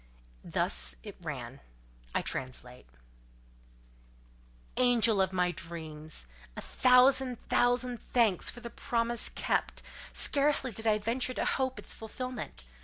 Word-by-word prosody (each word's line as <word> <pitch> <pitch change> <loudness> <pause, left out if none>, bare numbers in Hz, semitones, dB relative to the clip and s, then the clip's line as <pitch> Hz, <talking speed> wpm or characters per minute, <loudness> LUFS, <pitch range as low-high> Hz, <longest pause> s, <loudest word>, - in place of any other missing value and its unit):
Thus 60 -1 +1
it - - -9
ran—I - - -7
translate:— 125 - -5 1.9
"Angel 235 -4 +4
of 190 0 +1
my 180 -1 +1
dreams! 155 - -4 0.3
A - - -4
thousand, 255 0 +4
thousand 245 0 +2
thanks 225 -7 +2
for 240 - -7
the 235 -1 -7
promise 235 0 0
kept: - - -2 0.3
scarcely 280 -3 +3
did 225 +2 -3
I 215 -1 +4
venture 245 +4 -1
to - - -1
hope 260 -1 0
its - - -1
fulfilment. 250 - -6
225 Hz, 110 wpm, -30 LUFS, 155-250 Hz, 1.9 s, Angel